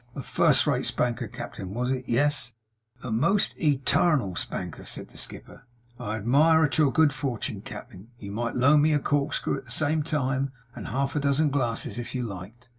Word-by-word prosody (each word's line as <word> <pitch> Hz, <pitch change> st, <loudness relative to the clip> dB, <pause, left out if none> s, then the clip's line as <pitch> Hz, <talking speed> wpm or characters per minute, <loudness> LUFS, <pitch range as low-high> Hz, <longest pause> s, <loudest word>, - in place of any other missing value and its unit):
A 135 Hz, -, -5 dB
first -, -, +3 dB
rate -, -, +1 dB
spanker, 120 Hz, -2 st, -1 dB
cap'en, 95 Hz, +1 st, -7 dB
was 125 Hz, +2 st, -1 dB
it? 130 Hz, -1 st, -2 dB
Yes?' 140 Hz, -1 st, +2 dB, 0.5 s
'A 125 Hz, -, -4 dB
most 170 Hz, -, +2 dB
e 150 Hz, -3 st, +2 dB
tarnal 135 Hz, -, +2 dB
spanker,' -, -, -4 dB
said -, -, -5 dB
the -, -, -13 dB
skipper. -, -, -6 dB, 0.3 s
'I 105 Hz, +1 st, -3 dB
admire 150 Hz, +9 st, +4 dB
at 145 Hz, +2 st, -1 dB
your 145 Hz, -3 st, +4 dB
good 150 Hz, +2 st, +4 dB
fortun, 130 Hz, -5 st, -3 dB
cap'en. 95 Hz, +4 st, -10 dB
You 100 Hz, -3 st, -8 dB
might 115 Hz, +2 st, -3 dB
loan 140 Hz, +4 st, +5 dB
me 155 Hz, +1 st, +3 dB
a 145 Hz, -, +3 dB
corkscrew 140 Hz, -1 st, 0 dB
at 135 Hz, -, -16 dB
the -, -, -17 dB
same 155 Hz, +5 st, +1 dB
time, 135 Hz, -3 st, -1 dB, 0.2 s
and -, -, -7 dB
half 135 Hz, +5 st, -1 dB
a -, -, +2 dB
dozen 140 Hz, +1 st, +2 dB
glasses 120 Hz, -3 st, -1 dB
if 120 Hz, -, -6 dB
you 125 Hz, -, -1 dB
liked. 110 Hz, +3 st, -8 dB
135 Hz, 190 wpm, -26 LUFS, 120-145 Hz, 0.5 s, loan